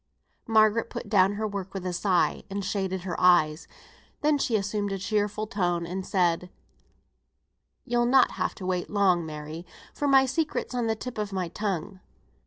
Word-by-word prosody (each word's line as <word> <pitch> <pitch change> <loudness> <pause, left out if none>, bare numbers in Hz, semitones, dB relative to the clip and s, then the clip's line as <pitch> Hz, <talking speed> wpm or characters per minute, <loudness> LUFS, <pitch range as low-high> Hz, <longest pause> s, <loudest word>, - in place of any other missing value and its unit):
Margaret 220 0 +3
put - - -7
down 195 -1 +4
her 215 +1 -2
work 200 -2 -6
with 190 -1 -4
a 180 - -2
sigh, 180 0 +1
and 200 0 -4
shaded 190 -2 -2
her 175 -2 -4
eyes. 175 -3 +4 0.5
Then 295 -1 +2
she 235 - 0
assumed 205 0 -1
a 195 - -2
cheerful 210 +2 -1
tone, 175 -5 -1
and 185 +3 -4
said, 180 -2 0 1.4
"You'll 240 0 +1
not 260 +1 +5
have - - -2
to 190 - -8
wait 180 -1 -2
long, 190 -4 +2
Mary, 155 +2 -7 0.3
for 290 - -2
my 270 -1 +6
secret's 300 +1 -2
on 240 -2 -1
the 220 - +1
tip 245 +1 -7
of 210 -1 -3
my 185 -3 -2
tongue. 190 -1 -3
200 Hz, 175 wpm, -27 LUFS, 180-220 Hz, 1.4 s, my